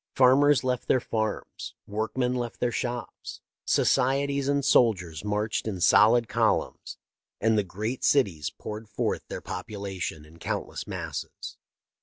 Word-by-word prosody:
Farmers 135 Hz, +2 st, +5 dB
left 125 Hz, -1 st, -1 dB
their 130 Hz, -, +4 dB
farms, 110 Hz, -3 st, -4 dB
workmen 110 Hz, +4 st, -1 dB
left 120 Hz, -2 st, -4 dB
their 125 Hz, -, +1 dB
shops, 120 Hz, +1 st, -5 dB, 0.3 s
societies 140 Hz, +1 st, +2 dB
and 140 Hz, -1 st, +1 dB
soldiers 90 Hz, -, +2 dB
marched 105 Hz, +1 st, -1 dB
in 100 Hz, -4 st, -3 dB
solid 115 Hz, +6 st, +5 dB
columns, -, -, 0 dB, 0.4 s
and 110 Hz, +1 st, +2 dB
the 105 Hz, -, +3 dB
great 110 Hz, +7 st, -4 dB
cities 95 Hz, -, +2 dB
poured 105 Hz, 0 st, -8 dB
forth 105 Hz, -, -2 dB
their -, -, -6 dB
population 95 Hz, -7 st, -5 dB
in 80 Hz, +2 st, -17 dB
countless -, -, -4 dB
masses. -, -, -6 dB
110 Hz, 130 wpm, -27 LUFS, 100-125 Hz, 0.4 s, Farmers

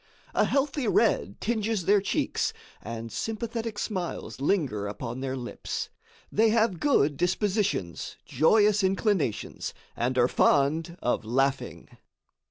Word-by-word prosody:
A -, -, +3 dB
healthy 275 Hz, -2 st, 0 dB
red 205 Hz, -, +2 dB
tinges 220 Hz, -4 st, -1 dB
their 205 Hz, 0 st, +4 dB
cheeks 195 Hz, -, 0 dB, 0.3 s
and 115 Hz, 0 st, -6 dB
sympathetic 225 Hz, -, -3 dB
smiles 185 Hz, -, -4 dB
linger 140 Hz, -, 0 dB
upon 115 Hz, +4 st, -5 dB
their 135 Hz, 0 st, -3 dB
lips. 125 Hz, -1 st, -5 dB, 0.4 s
They 220 Hz, +2 st, +4 dB
have 220 Hz, -5 st, +2 dB
good 150 Hz, -, +3 dB
dispositions, 185 Hz, -, -1 dB
joyous 205 Hz, -, +4 dB
inclinations, 190 Hz, -, 0 dB, 0.2 s
and 125 Hz, +2 st, -1 dB
are 120 Hz, -1 st, +5 dB
fond 155 Hz, +6 st, +2 dB
of 120 Hz, -, +1 dB
laughing. 135 Hz, +4 st, -1 dB
180 Hz, 115 wpm, -27 LUFS, 130-215 Hz, 0.4 s, are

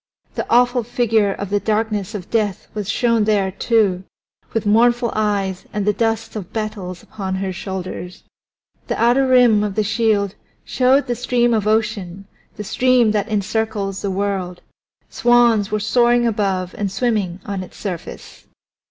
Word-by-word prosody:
The -, -, -4 dB
awful 245 Hz, +1 st, +3 dB
figure 225 Hz, -3 st, +1 dB
of 200 Hz, 0 st, -6 dB
the 205 Hz, -, +2 dB
Darkness 215 Hz, 0 st, -1 dB
of 185 Hz, -4 st, -7 dB
Death 210 Hz, -5 st, -1 dB
was 210 Hz, -2 st, -4 dB
shown 230 Hz, -2 st, +2 dB
there, 200 Hz, -3 st, +1 dB
too, 200 Hz, -3 st, +1 dB, 0.5 s
with 225 Hz, -, -2 dB
mournful 235 Hz, +3 st, +3 dB
eyes 200 Hz, -3 st, -1 dB
and 210 Hz, -2 st, -2 dB
the 210 Hz, -, +2 dB
dust 225 Hz, +1 st, -1 dB
of 205 Hz, -3 st, -6 dB
battles 210 Hz, -5 st, -5 dB
upon 190 Hz, -3 st, -5 dB
her 190 Hz, 0 st, -3 dB
shoulders. 185 Hz, -1 st, -6 dB, 0.6 s
The -, -, -2 dB
outer 245 Hz, +3 st, +3 dB
rim 245 Hz, -5 st, +5 dB
of 205 Hz, -2 st, -3 dB
the 215 Hz, -, +1 dB
shield 210 Hz, -2 st, +1 dB, 0.3 s
showed 255 Hz, +4 st, +3 dB
the 245 Hz, -, -1 dB
Stream 240 Hz, 0 st, +1 dB
of 215 Hz, -2 st, 0 dB
Ocean, 210 Hz, -4 st, -1 dB, 0.3 s
the 210 Hz, -, -6 dB
stream 250 Hz, +1 st, +3 dB
that 210 Hz, 0 st, -1 dB
encircles 210 Hz, -1 st, -2 dB
the 200 Hz, -, -2 dB
world; 190 Hz, -2 st, -3 dB, 0.4 s
swans 240 Hz, -4 st, +3 dB
were 215 Hz, -, -1 dB
soaring 240 Hz, +2 st, +3 dB
above 195 Hz, -5 st, -1 dB
and 200 Hz, -2 st, -1 dB
swimming 195 Hz, -4 st, -1 dB
on 200 Hz, -2 st, -4 dB
its 185 Hz, -, -11 dB
surface. 185 Hz, -5 st, -7 dB
210 Hz, 155 wpm, -19 LUFS, 195-230 Hz, 0.6 s, rim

